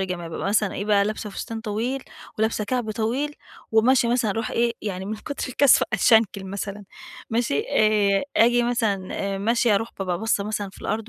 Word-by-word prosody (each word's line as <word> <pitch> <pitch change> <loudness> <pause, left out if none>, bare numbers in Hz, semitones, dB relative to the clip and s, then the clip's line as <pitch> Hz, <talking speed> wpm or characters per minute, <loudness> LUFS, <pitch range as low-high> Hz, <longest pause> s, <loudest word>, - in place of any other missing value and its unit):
الجماعي، 180 -3 -3
بابقي 165 +4 -4
مثلًا 210 -1 +1
إيه 200 - -3
بقى، 205 -1 +3
لابْسة 215 0 -4
فستان 225 +3 -6
طويل، 235 +5 -3 0.4
ولابسة 220 -1 0
كعب 240 -1 -2
طويل، 245 +7 -2 0.4
وماشية 240 +2 +4
مثلًا 235 -3 +1
أروح 225 +3 -2
إيه 235 0 +1
يعني 190 -3 -4
من 215 +2 -3
كُتْر 285 +6 -5
الكسْفة 265 +1 +4
أتشنْكل 220 -1 +3
مثلًا 200 +1 -5 0.5
ماشي، 225 -11 0
آآ 210 -1 +3
آجي 240 +2 +5
مثلًا 220 -6 0 0.3
آآ - - -4
ماشية 230 +2 +2
أروح 225 +3 0
بابقى 180 -3 -2
باصّة 220 -2 0
مثلًا 205 -2 -3
في - - -16
الأرض، 215 +1 -3
215 Hz, 180 wpm, -24 LUFS, 200-235 Hz, 0.5 s, آجي